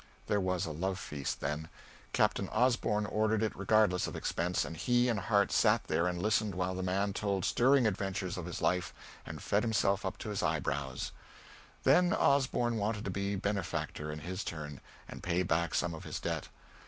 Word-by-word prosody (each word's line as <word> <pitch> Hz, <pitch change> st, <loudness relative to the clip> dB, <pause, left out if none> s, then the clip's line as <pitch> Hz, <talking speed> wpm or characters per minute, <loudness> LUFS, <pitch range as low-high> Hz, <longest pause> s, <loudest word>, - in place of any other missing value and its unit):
There 100 Hz, -1 st, +1 dB
was 90 Hz, -1 st, 0 dB
a 80 Hz, -, -4 dB
love 95 Hz, +5 st, -2 dB
feast, 75 Hz, -7 st, -4 dB
then. 80 Hz, +2 st, -3 dB, 0.4 s
Captain -, -, +1 dB
Osborn 110 Hz, -3 st, +2 dB
ordered 110 Hz, +1 st, +1 dB
it 110 Hz, -, -1 dB
regardless 100 Hz, -2 st, +3 dB
of -, -, -6 dB
expense, 90 Hz, +1 st, -1 dB
and 80 Hz, -, -6 dB
he 120 Hz, +7 st, +2 dB
and 115 Hz, -4 st, +1 dB
Harte 100 Hz, +1 st, +2 dB
sat -, -, +4 dB
there 85 Hz, -, +1 dB
and 90 Hz, -1 st, -2 dB
listened 105 Hz, 0 st, +1 dB
while 90 Hz, 0 st, -1 dB
the 95 Hz, -, -3 dB
man 95 Hz, +2 st, 0 dB
told 100 Hz, -2 st, -1 dB
stirring 130 Hz, +1 st, +4 dB
adventures 95 Hz, -3 st, -1 dB
of 90 Hz, -2 st, -5 dB
his 90 Hz, -, -5 dB
life 90 Hz, -2 st, +1 dB, 0.3 s
and -, -, -7 dB
fed 100 Hz, -, +2 dB
himself 105 Hz, -4 st, +1 dB
up 95 Hz, -, -3 dB
to 105 Hz, -, -5 dB
the 100 Hz, -, -2 dB
eyebrows. 70 Hz, -4 st, -1 dB, 0.7 s
Then 180 Hz, +1 st, +5 dB
Osborn 125 Hz, -, +2 dB
wanted 105 Hz, +1 st, -1 dB
to 100 Hz, -, -2 dB
be 100 Hz, +1 st, -1 dB
benefactor 95 Hz, -6 st, -2 dB
in 75 Hz, 0 st, -6 dB
his 90 Hz, +5 st, -4 dB
turn, 75 Hz, -3 st, -6 dB, 0.3 s
and -, -, -9 dB
pay 90 Hz, +1 st, +1 dB
back 85 Hz, -2 st, 0 dB
some 85 Hz, -1 st, 0 dB
of 80 Hz, -, -8 dB
his -, -, -5 dB
debt. -, -, -3 dB
95 Hz, 190 wpm, -32 LUFS, 85-105 Hz, 0.7 s, Then